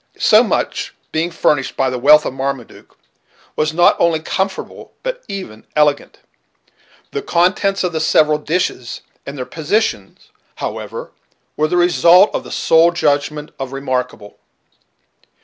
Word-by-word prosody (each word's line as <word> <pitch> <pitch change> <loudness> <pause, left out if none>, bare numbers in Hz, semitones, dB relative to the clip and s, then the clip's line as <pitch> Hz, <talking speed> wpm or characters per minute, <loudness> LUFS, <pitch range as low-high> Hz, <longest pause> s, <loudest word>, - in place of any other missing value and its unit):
So - - +5
much, - - -2 0.2
being 160 +2 -1
furnished 150 -5 0
by 135 -1 +1
the 125 - -3
wealth 150 +4 +6
of - - -3
Marmaduke, 135 -2 -6 0.6
was 155 0 0
not 175 +2 +4
only 165 -2 +2
comfortable 190 +4 -4
but - - -4
even 185 - -7
elegant. 150 -1 +1 0.9
The 425 - -3
contents 195 - +1
of 180 - -1
the 160 - -1
several 155 -1 +3
dishes, 150 -6 -3 0.3
and 140 +1 -7
their 125 - -4
positions, 160 - -2 0.3
however, - - -6 0.4
were 155 - +1
the 180 - -1
result 175 +2 +5
of - - -2
the - - -11
sole 165 +1 +4
judgment 150 -2 -1
of 135 0 -5
Remarkable. 125 -6 -4
155 Hz, 135 wpm, -17 LUFS, 135-175 Hz, 0.9 s, wealth